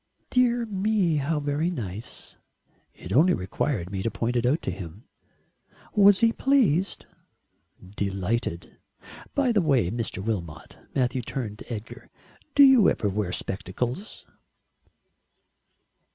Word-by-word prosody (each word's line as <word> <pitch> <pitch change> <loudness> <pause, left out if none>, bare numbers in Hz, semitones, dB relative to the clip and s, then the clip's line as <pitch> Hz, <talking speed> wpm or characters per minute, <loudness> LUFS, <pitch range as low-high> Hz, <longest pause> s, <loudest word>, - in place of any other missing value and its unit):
"Dear 245 -1 +3
me, 200 -5 +1
how 150 +2 0
very 145 +3 -1
nice." 110 - -6 0.6
"It 90 +2 -7
only 165 - +5
required 95 - -2
me 95 -1 -3
to 115 - 0
point 115 +2 -2
it 120 0 +2
out 145 +6 +1
to - - -2
him." 90 +3 -9 0.9
"Was 205 -1 +6
he 230 0 +4
pleased?" 205 - +2 0.9
"Delighted. 100 -2 -2 0.6
By 275 -3 +2
the 210 -4 +3
way, 135 - +2
Mr. 115 -1 -3
Wilmot," 90 -7 -5 0.2
Matthew 125 -1 +1
turned 110 -3 -5
to - - -11
Edgar 110 -1 -7 0.5
"do 285 - +8
you 265 -7 +7
ever 105 - -1
wear 100 -2 -2
spectacles?" 120 - -4
125 Hz, 125 wpm, -26 LUFS, -, 0.9 s, do